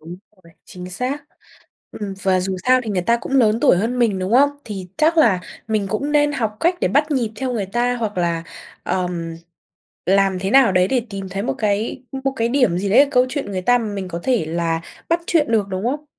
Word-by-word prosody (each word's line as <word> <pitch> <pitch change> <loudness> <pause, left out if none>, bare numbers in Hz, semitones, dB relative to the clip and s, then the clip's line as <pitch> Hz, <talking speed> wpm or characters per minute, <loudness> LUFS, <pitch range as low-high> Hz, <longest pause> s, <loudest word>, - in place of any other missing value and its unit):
Đúng 165 +3 -9 0.3
rồi, 170 - -18
chính 180 0 -9
xác. 255 +9 -3 0.7
Ừm, 200 -2 -6
và 185 -1 +2
dù 190 +1 -2
sao 255 0 +5
thì 220 - -3
người 185 -3 0
ta 235 +6 +2
cũng 255 - -7
lớn 230 -4 +3
tuổi - - +5
hơn 230 +7 -1
mình, 220 -5 +2
đúng 185 +4 -3
không? 280 +3 +5
Thì 195 -4 -7
chắc 320 +2 +2
là 210 - +4 0.3
mình 215 -3 0
cũng 280 +7 -2
nên 295 0 +3
học 220 -6 -2
cách 345 +2 +3
để - - +2
bắt 295 +3 +2
nhịp 240 -6 0
theo 260 -1 -2
người 210 -5 -2
ta, 240 +5 0
hoặc 215 -5 -3
là, 170 -1 -1 0.4
ờm, 175 -3 -3 0.7
làm 195 0 +3
thế 190 +1 -2
nào 260 -5 +5
đấy 185 0 +3
để 250 0 +1
tìm 195 -1 -6
thấy 195 +2 -3
một 135 - -1
cái 210 +4 -1 0.2
một 270 - +1
cái 230 +1 +1
điểm 245 -10 +2
gì 195 +1 -2
đấy 215 - +6
ở 290 - +6
câu 250 -2 +3
chuyện 275 -6 -4
người 185 -2 -3
ta 245 +5 +4
mà 230 - -3
mình 195 -3 -4
có 170 -1 -5
thể 245 -11 +1
là 165 0 -1 0.3
bắt 335 +1 +2
chuyện 300 -8 +1
được, 210 -3 +2
đúng 190 +3 -3
không? 290 +5 -2
215 Hz, 235 wpm, -20 LUFS, 185-255 Hz, 0.7 s, đấy